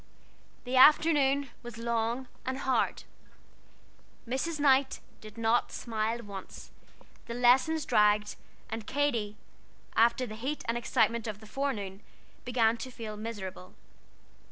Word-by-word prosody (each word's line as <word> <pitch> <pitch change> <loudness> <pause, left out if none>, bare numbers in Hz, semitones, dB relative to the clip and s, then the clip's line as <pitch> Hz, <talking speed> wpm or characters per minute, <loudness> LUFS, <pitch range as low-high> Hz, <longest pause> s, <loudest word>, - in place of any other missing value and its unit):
The 255 +1 -1
afternoon 280 -1 +5
was 240 -2 -9
long 235 +2 -1 0.2
and 260 0 -3
hard. 265 -1 0 1.2
Mrs. 295 +6 -2
Knight 275 -1 +3 0.2
did 215 0 -12
not 230 +1 +1
smile 225 0 -2
once; 200 -2 -9 0.6
the 235 - -5
lessons 260 +6 +3
dragged; 210 0 +3 0.3
and 225 -1 -6
Katy, 235 -8 -1 0.6
after 235 +3 +3
the 215 - -8
heat 265 +7 -4
and 230 - 0
excitement 235 -1 +1
of 210 -1 -5
the 215 - -13
forenoon, 210 -6 -3 0.4
began 235 -2 +2
to 255 - -6
feel 225 -3 -7
miserable. 205 -4 -7
235 Hz, 120 wpm, -30 LUFS, 215-265 Hz, 1.2 s, afternoon